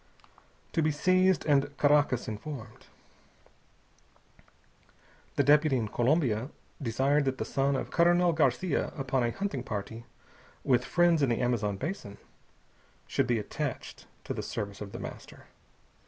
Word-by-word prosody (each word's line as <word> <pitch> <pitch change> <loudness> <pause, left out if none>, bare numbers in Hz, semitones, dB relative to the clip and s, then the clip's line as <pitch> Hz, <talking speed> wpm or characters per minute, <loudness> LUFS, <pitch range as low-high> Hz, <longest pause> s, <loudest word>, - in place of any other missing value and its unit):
To 165 - +2
be 155 - +2
seized 185 +4 +2
and 145 -1 +1
Caracas 145 -4 +3
informed. 110 +1 -8 2.5
The 140 - +3
deputy 150 0 +4
in 110 -3 -2
Colombia 125 -1 +1 0.3
desired 135 +4 +1
that 130 -1 -1
the - - -3
son 140 0 0
of 130 - -4
Colonel 175 0 +4
García 155 +2 0
upon 135 -1 0
a 120 - +1
hunting 195 -2 -3
party 115 0 -6 0.6
with 125 -3 +2
friends 175 0 +3
in 140 - +3
the 115 - 0
Amazon 110 -5 0
basin 135 - -5 0.9
should - - 0
be 120 - +2
attached 105 - -5 0.2
to - - -4
the - - -4
service 100 -1 -5
of 100 -1 -6
The - - -7
Master. - - -9
135 Hz, 135 wpm, -29 LUFS, 120-155 Hz, 2.5 s, deputy